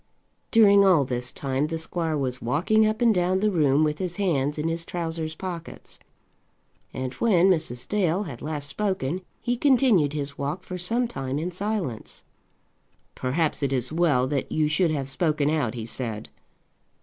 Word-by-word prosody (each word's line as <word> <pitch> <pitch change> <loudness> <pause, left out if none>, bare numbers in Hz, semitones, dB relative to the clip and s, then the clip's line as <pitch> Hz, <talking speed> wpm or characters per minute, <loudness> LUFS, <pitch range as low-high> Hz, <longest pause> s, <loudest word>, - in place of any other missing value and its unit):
During 200 -3 +6
all 180 -8 +5
this 125 0 -3
time 135 +1 -1
the 165 +1 -3
squire 160 -1 -2
was 130 -3 -3
walking 180 - +2
up 215 +1 -2
and 230 -2 +5
down 185 0 +1
the 210 +1 +2
room 150 -4 +3
with 150 0 0
his 180 -2 -3
hands 150 -7 0
in 150 +2 -1
his 165 0 -1
trousers 165 -2 -4
pockets. 170 -2 -8 0.9
And 130 0 -4
when 190 -5 +3
Mrs. 135 -8 -1
Dale 195 -2 +1
had 140 - -8
last 150 -2 -4
spoken, 185 -1 -2 0.2
he 245 0 0
continued 245 - +3
his 140 -1 -4
walk 150 +6 -3
for 185 0 -6
some 235 +7 0
time 135 - -4
in 170 +4 -2
silence. 185 - -4 0.9
"Perhaps 150 +5 -1
it 140 -2 0
is 130 +1 0
well 155 -7 +3
that 135 0 -2
you 155 -1 +2
should 165 +3 +2
have 140 -4 -2
spoken 150 0 0
out," 140 -7 0
he 115 -2 -5
said. 115 -2 -5
160 Hz, 170 wpm, -25 LUFS, 140-185 Hz, 0.9 s, During